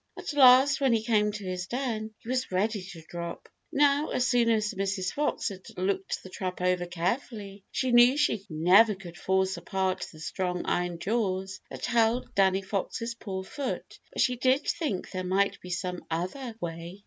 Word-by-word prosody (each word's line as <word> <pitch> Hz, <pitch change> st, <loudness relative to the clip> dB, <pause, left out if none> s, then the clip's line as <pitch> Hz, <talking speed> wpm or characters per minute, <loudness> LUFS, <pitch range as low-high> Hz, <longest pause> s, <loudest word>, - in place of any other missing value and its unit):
At -, -, -5 dB
last, 270 Hz, 0 st, +7 dB
when 265 Hz, -3 st, +4 dB
he 220 Hz, -1 st, +1 dB
came 210 Hz, -2 st, +2 dB
to 205 Hz, -1 st, -7 dB
his 185 Hz, 0 st, -3 dB
den, 225 Hz, -3 st, -3 dB
he -, -, -18 dB
was 255 Hz, -2 st, -1 dB
ready 205 Hz, +3 st, 0 dB
to 180 Hz, -3 st, -10 dB
drop. 170 Hz, -1 st, -6 dB, 0.2 s
Now, 290 Hz, 0 st, +3 dB
as 250 Hz, -, +1 dB
soon 240 Hz, -2 st, +3 dB
as 215 Hz, -1 st, +1 dB
Mrs. 195 Hz, -1 st, -2 dB
Fox 295 Hz, -5 st, 0 dB
had 190 Hz, -2 st, -9 dB, 0.2 s
looked 190 Hz, +1 st, -1 dB
the 185 Hz, -, -10 dB
trap 185 Hz, -1 st, -4 dB
over 180 Hz, -1 st, +1 dB
carefully, 195 Hz, +2 st, -3 dB
she 260 Hz, -1 st, 0 dB
knew 240 Hz, +3 st, +7 dB
she 220 Hz, -9 st, +1 dB
never 185 Hz, +7 st, +5 dB
could 175 Hz, -3 st, -11 dB
force 190 Hz, 0 st, 0 dB
apart 185 Hz, +1 st, -2 dB
the 155 Hz, -, -14 dB
strong 180 Hz, +2 st, -3 dB
iron 175 Hz, -1 st, -1 dB
jaws 190 Hz, -1 st, -1 dB
that -, -, -5 dB
held 235 Hz, 0 st, +1 dB
Danny 195 Hz, 0 st, +3 dB
Fox's 215 Hz, +4 st, -3 dB
poor 190 Hz, -5 st, -5 dB
foot, 270 Hz, +7 st, -5 dB
but -, -, +2 dB
she 250 Hz, -1 st, +1 dB
did 260 Hz, +3 st, +3 dB
think 280 Hz, -, -2 dB
there 185 Hz, 0 st, -3 dB
might 195 Hz, +2 st, +1 dB
be 180 Hz, -, -9 dB
some 180 Hz, 0 st, -3 dB
other 205 Hz, +9 st, -3 dB
way. 170 Hz, +2 st, -6 dB
195 Hz, 185 wpm, -28 LUFS, 185-240 Hz, 0.2 s, last